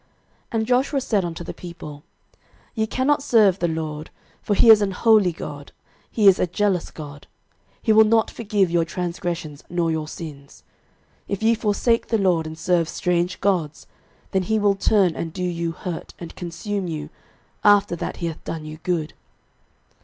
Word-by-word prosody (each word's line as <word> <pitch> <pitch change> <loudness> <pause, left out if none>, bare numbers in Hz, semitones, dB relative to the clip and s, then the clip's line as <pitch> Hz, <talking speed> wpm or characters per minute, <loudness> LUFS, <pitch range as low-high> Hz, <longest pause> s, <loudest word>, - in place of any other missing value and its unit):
06:024:019 - - -39 0.4
And 220 -1 +1
Joshua 265 +3 +1
said 210 -6 0
unto 170 0 -5
the - - -6
people, 155 -4 -10 0.7
Ye 220 -1 -1
cannot 265 +6 +1
serve 215 -8 +4
the 175 - +1
LORD: 155 -1 -4 0.3
for 205 - 0
he 225 - +7
is 215 -1 +7
an 195 -2 0
holy 215 -3 +4
God; 145 -3 -8 0.4
he 210 -3 +2
is 190 - +7
a - - +2
jealous 185 0 0
God; 145 -2 -10 0.6
he 220 - +4
will 220 +1 +8
not 220 +1 +2
forgive 205 -5 0
your 170 -1 +3
transgressions 170 -3 -4
nor 170 -1 0
your 155 -1 -2
sins. 145 -4 -10 0.7
06:024:020 - - -2
If 200 - -3
ye 225 +1 +5
forsake 230 +1 +1
the 225 - +1
LORD, 180 -5 +1
and 160 0 -8
serve 170 -2 +1
strange 180 +1 -1
gods, 175 -7 0 0.5
then 190 - +1
he 220 +4 0
will 205 -1 +3
turn 195 -3 +2
and 165 - -4
do 180 +2 -5
you 170 -2 -2
hurt, 175 0 -7
and 170 -2 -9
consume 185 +3 -4
you, 155 -2 -5 0.5
after 205 -3 +4
that - - -5
he 170 - -4
hath 165 -2 -5
done 160 -2 -5
you 155 0 -8
good. 165 -4 -2
180 Hz, 180 wpm, -22 LUFS, 165-210 Hz, 0.7 s, will